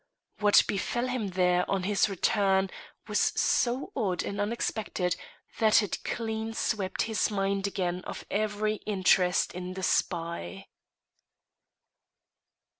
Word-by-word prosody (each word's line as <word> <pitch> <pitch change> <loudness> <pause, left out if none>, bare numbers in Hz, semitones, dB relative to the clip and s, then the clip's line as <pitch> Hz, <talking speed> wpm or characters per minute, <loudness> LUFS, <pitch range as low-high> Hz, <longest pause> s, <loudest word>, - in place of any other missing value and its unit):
What 205 -1 +6
befell 240 +5 -1
him 250 -5 -2
there 180 -1 +2
on 195 -2 0
his 205 +2 +2
return 195 0 +2 0.4
was - - +1 0.2
so 245 +3 +1
odd 195 -9 0
and 200 0 -3
unexpected 205 -4 -1 0.4
that 220 -1 +5
it 205 - -4
clean 225 -1 -3
swept 195 -5 -1
his 220 -1 0
mind 195 -1 0
again 180 -2 -2
of - - -7
every 215 +1 0
interest 185 -3 +3
in 180 +1 -6
the 190 - -5
spy. 170 - -1
200 Hz, 115 wpm, -28 LUFS, 185-215 Hz, 0.4 s, What